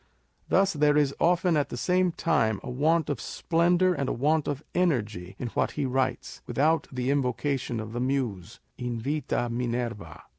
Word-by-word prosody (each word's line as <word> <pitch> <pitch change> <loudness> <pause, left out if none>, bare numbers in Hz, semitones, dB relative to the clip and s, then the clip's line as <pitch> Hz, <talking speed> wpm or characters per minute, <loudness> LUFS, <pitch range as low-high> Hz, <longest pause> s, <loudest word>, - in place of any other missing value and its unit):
Thus 195 +1 +3
there 150 -1 +3
is 145 -2 +2
often 175 0 +3
at 145 -2 +1
the - - -5
same 180 +5 +2
time 115 -12 +1
a - - -5
want 155 +5 +2
of 135 -6 -3
splendour 175 +2 +2
and 140 -6 -2
a - - 0
want 150 +4 +1
of 145 +1 -3
energy 110 - -1
in 120 - -4
what - - -1
he 145 - -1
writes, 130 -1 -2
without 150 +7 +1
the 125 0 -1
invocation 135 -2 -1
of 110 0 -6
the 120 - -3
Muse 125 -9 -2 0.2
â€" 125 - -4
invita 120 +2 -1
Minerva. 115 -8 -3
135 Hz, 175 wpm, -27 LUFS, 120-160 Hz, 0.2 s, Thus